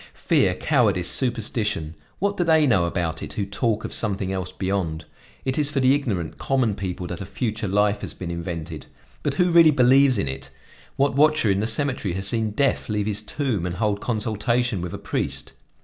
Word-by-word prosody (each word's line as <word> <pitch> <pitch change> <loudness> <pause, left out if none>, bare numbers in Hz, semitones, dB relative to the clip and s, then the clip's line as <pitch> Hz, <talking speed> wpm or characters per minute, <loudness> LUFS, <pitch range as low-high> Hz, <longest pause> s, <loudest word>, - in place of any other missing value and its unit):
"Fear, - - +2
cowardice, 90 -1 +1
superstition! 110 - 0 0.2
What 200 +1 -1
do 175 - 0
they 160 -2 +4
know 100 -10 +3
about 85 -2 -2
it - - -6
who 100 - -2
talk 105 +2 -1
of - - -4
something 100 -3 +1
else 95 -1 -4
beyond? 90 -5 -3 0.4
It 130 +2 -1
is 145 -1 +2
for 145 -1 -1
the 130 0 +4
ignorant, 105 - -2
common 130 -6 +1
people 95 -2 -5
that 90 0 -6
a - - -5
future 110 -1 -3
life 105 +1 +1
has - - -4
been 90 -2 -6
invented, 85 -2 -6 0.3
but - - -2
who 180 -1 +2
really 165 -1 +7
believes 130 -1 +5
in 100 - -1
it? 65 0 -6 0.5
What 140 +1 +1
watcher 150 -7 +3
in 95 - +1
the 110 - 0
cemetery 115 -6 0
has 95 +1 0
seen 110 0 +1
Death 135 +5 0
leave 105 -1 -1
his 105 -1 -1
tomb 115 - -2
and 90 0 -3
hold 105 0 -1
consultation 115 -1 -1
with 90 -1 -5
a - - -5
priest? - - -4
105 Hz, 195 wpm, -23 LUFS, 95-130 Hz, 0.5 s, really